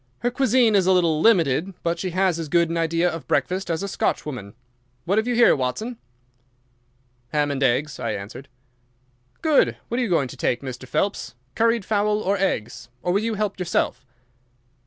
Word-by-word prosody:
"Her 245 - 0
cuisine 250 -3 +3
is 190 -3 +3
a - - +5
little 170 -4 +2
limited, 175 - +3
but 170 0 -1
she 185 - -2
has 185 -1 +1
as 160 -3 -5
good 170 0 +2
an 170 - -1
idea 165 +1 +1
of 165 -2 -4
breakfast 185 +1 0
as 165 +3 -1
a - - -2
Scotch 195 - -1
woman. 115 -9 -7 0.5
What 200 +5 +2
have 220 - -2
you 245 - 0
here, 240 0 +6
Watson?" 215 - -3 1.3
"Ham 145 +2 0
and 140 -1 -3
eggs," 135 +3 +1
I 115 -3 -2
answered. 105 +8 -8 1.0
"Good! 310 -3 +3
What 240 - -1
are - - +1
you 235 - -2
going 155 -6 +2
to - - -10
take, 120 - 0
Mr. 130 -1 -7
Phelps—curried 195 - -1
fowl 210 0 +1
or 200 -1 0
eggs, 125 - -2
or 175 - 0
will 200 - +2
you 225 0 -1
help 205 -2 -2
yourself?" 170 -7 -1
175 Hz, 185 wpm, -23 LUFS, 140-210 Hz, 1.3 s, here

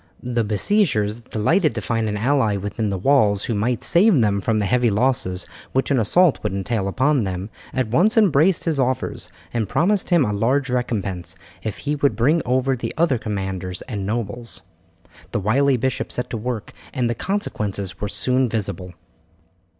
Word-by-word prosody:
The 120 -1 0
besiegers, 110 - +1
delighted 135 - +1
to - - -1
find 110 +2 -1
an 105 - -2
ally 110 -3 +2
within 105 +2 -3
the 95 - -2
walls 105 -3 +3
who 115 - -1
might 115 +3 -1
save 180 - +4
them 100 -3 +2
from 110 +3 0
the 105 - +1
heavy 120 +3 +2
losses 100 -5 0 0.3
which 135 +2 0
an 135 - +3
assault 160 - +3
would - - -2
entail 100 +1 -1
upon 130 +5 +2
them, 95 +2 -4 0.2
at 130 -3 -1
once 190 - +3
embraced 180 -4 +4
his 160 -4 -1
offers, 130 -1 -1 0.2
and 115 -4 -1
promised 195 +3 +1
him 170 -7 +4
a 105 - -1
large 130 +6 +1
recompense 95 -8 -2 0.3
if 110 0 -4
he 145 0 -2
would 140 -1 +1
bring 150 +8 +3
over 130 +1 +2
the 120 - -5
other 155 -7 +2
commanders 95 -4 -4
and 105 -6 -5
nobles. 115 +2 -3 0.7
The - - +1
wily 130 +7 +2
bishop 130 +2 -2
set 125 - -3
to 115 - -2
work, 115 -1 -4 0.2
and 125 -2 0
the 120 - 0
consequences 105 - -3
were 105 - -2
soon 130 +3 +1
visible. 95 -5 -4
115 Hz, 175 wpm, -22 LUFS, 105-135 Hz, 0.7 s, save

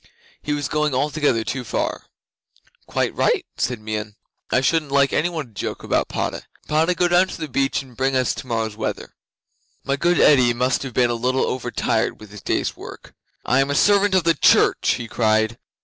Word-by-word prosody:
He 150 - -2
was 145 -2 -2
going 150 -3 0
altogether 145 -4 +1
too 130 +2 -4
far. 105 - -3 0.8
'"Quite - - -1
right," - - +1
said 125 -2 -2
Meon; 105 -1 -5 0.3
"I - - +3
shouldn't 150 +2 0
like 140 -1 +3
any 165 +4 +1
one 155 -7 -5
to - - -25
joke - - -5
about - - 0
Padda. - - -3 0.3
Padda, 160 +4 +2
go 175 - +2
down 175 +2 +4
to - - -8
the 155 - -4
beach 135 +1 0
and 130 -3 -17
bring 135 +1 0
us 130 -1 +1
tomorrow's 115 -4 -3
weather!" 110 0 -5 0.7
'My 140 +1 -1
good 175 +3 +2
Eddi 125 -5 +5
must 125 +1 0
have 135 -3 -7
been 120 -1 +3
a - - 0
little 125 +3 0
over 125 -1 -3
tired 110 -2 -1
with 105 -2 -13
his 105 -1 -10
day's - - -1
work. - - -11 0.3
"I 130 - +2
am 135 +1 +1
a 140 - 0
servant 200 +3 +4
of 185 - +3
the 165 0 +3
church," - - +3
he 115 - -6
cried. 110 0 +1
130 Hz, 200 wpm, -21 LUFS, 115-150 Hz, 0.8 s, Eddi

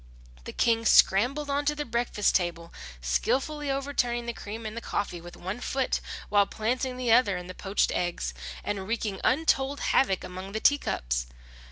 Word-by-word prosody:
The - - -5
King 230 -1 +2
scrambled 255 +10 +4
on 285 +1 0
to 295 +1 +2
the 295 0 -3
breakfast 235 -4 +1
table, 170 -2 -1 0.3
skilfully 270 - 0
overturning 270 -3 -1
the 235 - -3
cream 220 +1 -7
and 215 0 -5
the 235 - -4
coffee 180 -6 -3
with 175 +1 -11
one 190 +6 -5
foot, 265 +1 0 0.3
while 205 -1 +4
planting 250 +3 -2
the 250 -2 0
other 215 -5 +5
in 180 - -7
the 185 - -8
poached 195 +2 0
eggs, 175 - -2 0.3
and 195 -2 -3
wreaking 220 -3 -2
untold 280 -1 +2
havoc 195 -9 +3
among 185 +2 -7
the 220 - -1
teacups. - - +1
225 Hz, 170 wpm, -28 LUFS, 190-265 Hz, 0.3 s, other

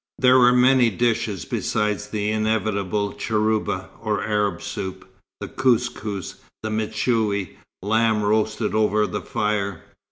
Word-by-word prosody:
There 130 0 +5
were 125 0 +6
many 125 0 +5
dishes 110 -3 -1
besides 105 -1 -1
the 105 0 -2
inevitable 105 -2 -1
cheurba, 105 -4 -1
or 105 -3 -1
Arab 105 -4 -1
soup, 95 -1 -6 0.3
the - - -5
kous 125 -2 +2
kous, 100 -3 -6 0.3
the 110 - -3
mechoui, 110 -2 -1 0.3
lamb 110 +1 +2
roasted 110 +1 0
over 105 0 +2
the - - -4
fire. 100 -4 -2
110 Hz, 125 wpm, -23 LUFS, 105-110 Hz, 0.3 s, were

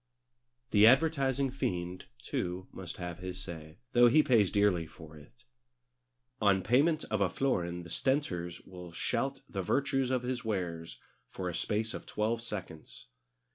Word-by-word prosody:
The 105 +1 +7
advertising 135 -1 +3
fiend, 90 -8 -3
too, 90 +8 -3
must 90 -2 -8
have 90 -1 -5
his 90 0 -6
say, 80 -2 -9
though 120 0 +7
he 155 +6 +5
pays 110 -7 +4
dearly 100 -5 +2
for 80 0 -13
it. 70 -5 -17 1.0
On 100 -2 +4
payment 150 +7 +3
of 110 -2 +1
a 95 - +3
florin 90 -9 -1
the 85 - -11
stentors 90 - -1
will 90 -2 -10
shout 135 +10 -2
the 95 - -3
virtues 135 +6 +1
of 130 -1 0
his 125 0 -2
wares 90 -6 -3 0.3
for 90 -1 -4
a - - -5
space 110 +5 -1
of - - -7
twelve 110 +2 -1
seconds. 95 - -7
100 Hz, 150 wpm, -31 LUFS, 85-125 Hz, 1.0 s, The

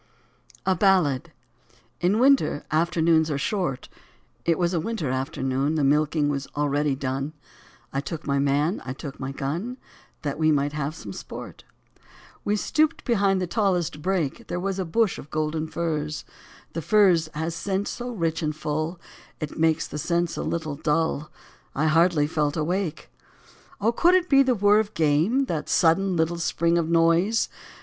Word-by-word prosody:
64 190 - +3
A - - -3
BALLAD. 170 -6 +2 0.7
IN 185 +4 +2
winter, 265 - +3
afternoons 160 0 +2
are 145 - -1
short; 175 -3 -2 0.6
It 165 -1 +2
was 175 0 +1
a 170 - +1
winter 170 - -2
afternoon. 135 +1 -1
The 150 - +1
milking 150 +1 +2
was 140 -1 -2
already 145 -1 +1
done; 135 +2 -3 0.6
I 135 - 0
took 160 +2 -6
my 140 -1 +1
man, 145 +6 +1
I 130 - -5
took 140 0 -8
my 130 0 -4
gun. 165 - -4 0.5
That 145 0 -3
we 155 0 +4
might 145 0 +1
have 150 +1 -3
some 100 -10 -8
sport. - - -9 0.8
We 205 - +1
stooped 310 +9 +1
behind 200 -6 +2
the 185 - 0
tallest 175 -5 0
brake; 175 -5 -1
There 175 - -3
was 195 +1 -2
a 190 - -1
bush 215 +4 +1
of 145 - -11
golden 155 +1 -2
furze; 155 -2 -3 0.5
The 165 - -3
furze 180 -4 +4
has 160 +2 -2
scent 195 +4 -2
so 245 0 -5
rich 165 -8 -1
and 155 -1 -1
full 155 +3 -3 0.4
It 155 -1 -5
makes 160 -1 +2
the 150 - -6
sense 170 +2 0
a - - -3
little 160 -3 -2
dull: 150 0 0 0.5
I 150 - +1
hardly 160 -1 +4
felt 150 0 -1
awake. 175 +2 -2 0.7
Oh, 215 +3 +2
could 345 +9 +4
it 365 -1 +2
be 275 -1 +6
the 260 -2 +3
whirr 205 0 +4
of 215 -1 -3
game, 165 - +2
That 165 - -3
sudden, 180 +2 +3
little 165 +1 0
spring 170 0 +1
of 165 -1 -1
noise 170 +6 +3
165 Hz, 170 wpm, -25 LUFS, 150-190 Hz, 0.8 s, be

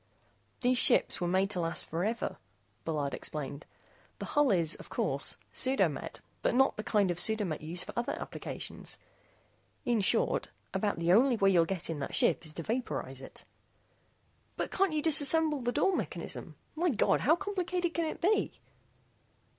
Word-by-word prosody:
"These 250 0 +3
ships - - +3
were 175 - 0
made 190 +3 +1
to 185 - -1
last 165 -1 -3
forever," 200 +9 -2 0.5
Bullard 150 -3 -2
explained. 145 -1 -5 0.5
"The - - -6
hull 295 -2 +4
is, 170 -4 +3
of - - -11
course, - - -1 0.2
pseudo 260 +1 +2
met, - - -7 0.2
but, - - +1
not 265 +1 +4
the 215 - -5
kind 205 -5 +2
of 175 - -2
pseudo 215 +3 +3
met 155 -4 -4
used 165 +3 -3
for - - -8
other 240 0 -1
applications. - - -5 0.9
In 235 -3 +2
short, - - +2 0.2
about 205 -2 -1
the 170 +1 +2
only 250 +4 +5
way 195 -2 +4
you'll 170 -3 +4
get 180 -1 -4
in 165 -3 -4
that 140 - -4
ship - - +3
is 155 -2 -5
to 165 - -6
vaporize 150 - -3
it." - - -13 1.1
"But - - -3
can't 390 -1 +1
you 305 -1 -1
simply 320 - +3 0.5
disassemble - - -8
the 240 - 0
door 325 +8 +2
mechanism? - - -5 0.2
My 345 +3 +1
God, 245 - +2
how 310 +5 +4
complicated 360 -2 -2
can 335 - 0
it 315 - -4
be?" 415 +5 +1
210 Hz, 175 wpm, -31 LUFS, 165-275 Hz, 1.1 s, only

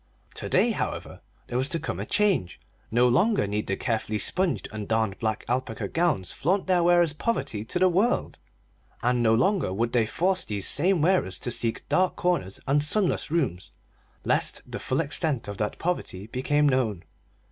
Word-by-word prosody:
To - - -4
day, - - +3
however, - - -4 0.2
there 120 - -2
was 130 +2 -1
to 165 - 0
come - - -4
a - - -4
change. 200 - +1 0.3
No 120 +2 +3
longer 180 - +3
need 105 +1 -3
the 95 - 0
carefully 110 -3 -1
sponged 185 - -1
and 105 -1 -6
darned 110 -3 0
black 110 -1 -2
alpaca 115 -4 -2
gowns 150 - 0
flaunt 185 +6 0
their 185 -2 +3
wearers' 175 -2 +4
poverty 150 - -2
to 145 - -3
the 185 +1 +4
world, 195 +7 +1 0.6
and 125 0 +2
no 115 -1 +4
longer 185 - +1
would 115 +5 -1
they 115 -3 +2
force 185 +8 0
these 105 -3 -2
same 175 +1 +2
wearers 175 - +2
to 120 - -3
seek 115 -1 -1
dark 185 0 +2
corners 175 - -1
and 145 +2 +2
sunless 180 +2 +1
rooms, 135 - -1 0.6
lest - - 0
the - - -6
full 130 +4 0
extent 145 - 0
of 100 -1 -6
that 105 -1 -2
poverty 160 - -3
become 145 +6 +1
known. 120 -9 0
130 Hz, 180 wpm, -26 LUFS, 110-175 Hz, 0.6 s, wearers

